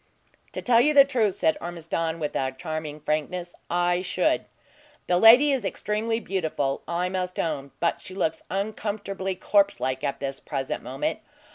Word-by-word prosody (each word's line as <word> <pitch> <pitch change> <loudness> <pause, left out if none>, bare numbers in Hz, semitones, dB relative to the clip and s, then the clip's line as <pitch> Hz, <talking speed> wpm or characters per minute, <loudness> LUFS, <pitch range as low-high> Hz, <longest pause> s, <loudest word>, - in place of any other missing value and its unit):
"To - - -5
tell 235 -2 +5
you 300 +3 +3
the 275 -1 +9
truth," 230 -8 +1
said 160 - +1
Ormiston, 165 -1 -3
with 150 -2 -3 0.2
charming 155 -1 -5
frankness, 170 +4 -2 0.2
"I 175 +1 +1
should! 180 - +1 0.6
The 175 0 +2
lady 245 +8 +8
is 265 -4 0
extremely 215 +3 -1
beautiful, 160 -10 -2
I 175 +1 0
must 185 -1 -3
own; 145 -4 -2
but 170 - 0
she 185 - -10
looks 160 -4 -1
uncomfortably 200 -1 -3
corpse 200 +2 +2
like 130 0 -2
at 140 - -2
this 135 -1 -4
present 135 -3 -4
moment. - - -3
180 Hz, 155 wpm, -25 LUFS, 160-205 Hz, 0.6 s, the